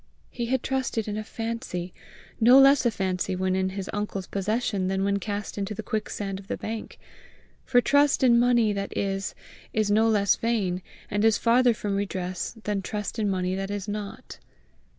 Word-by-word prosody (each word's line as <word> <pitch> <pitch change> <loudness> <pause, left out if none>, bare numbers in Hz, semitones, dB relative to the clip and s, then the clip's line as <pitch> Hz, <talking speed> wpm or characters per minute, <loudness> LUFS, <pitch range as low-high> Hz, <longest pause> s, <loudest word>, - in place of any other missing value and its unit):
He 240 -1 -3
had 260 0 0
trusted 255 -5 -1
in 210 - -3
a 215 - -3
fancy 225 -6 -5 0.5
no 245 +4 +7
less 275 -1 +6
a - - +4
fancy 185 -3 -2
when 185 0 0
in 190 0 +1
his 190 0 -5
uncle's 205 -2 -3
possession 205 0 -1
than 190 0 0
when 200 0 +1
cast 205 0 -4
into 200 +1 -3
the - - -5
quicksand 205 -2 -3
of 195 - -14
the - - -3
bank; 220 0 -6 0.7
for 245 -2 +4
trust 285 +1 +3
in 235 -2 +6
money 240 -3 +3
that 200 0 -4
is, 195 -1 -2 0.4
is 215 -1 +1
no 220 +2 +4
less 200 -3 +3
vain, 200 -6 -1 0.3
and 205 +1 0
is 225 -2 +5
farther 240 0 +4
from 205 -2 -2
redress, 190 +1 -3
than 205 -2 -1
trust 210 +3 -4
in 210 -2 +1
money 185 -1 -1
that 195 +1 -3
is 205 0 -4
not. 205 -1 -6
205 Hz, 185 wpm, -26 LUFS, 195-230 Hz, 0.7 s, no